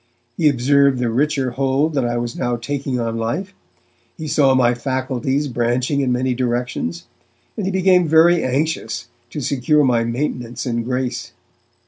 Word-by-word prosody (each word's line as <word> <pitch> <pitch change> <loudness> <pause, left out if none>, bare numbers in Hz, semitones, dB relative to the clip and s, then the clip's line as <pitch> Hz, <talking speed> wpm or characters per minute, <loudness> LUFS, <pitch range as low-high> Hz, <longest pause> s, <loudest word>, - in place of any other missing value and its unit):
He 155 +1 +3
observed 140 +1 +3
the 120 -2 -1
richer 135 0 0
hold 135 +4 0
that 135 -3 +1
I 120 0 -1
was 120 0 -3
now 120 0 -1
taking 130 +2 -3
on 115 -1 -2
life; 150 - -3 0.6
he 155 -2 -6
saw 140 -3 +3
my 120 -2 +3
faculties 130 +2 -2
branching 125 +3 0
in 130 -2 0
many 125 +1 0
directions, 120 -9 -2 0.5
and 200 -4 -3
he - - 0
became 185 -2 +3
very 165 +2 +5
anxious 130 -4 -2 0.2
to 150 - -5
secure 140 +3 +2
my 120 -3 +2
maintenance 120 0 -3
in 120 -2 -1
grace. 125 +1 -3
130 Hz, 155 wpm, -20 LUFS, 120-145 Hz, 0.6 s, very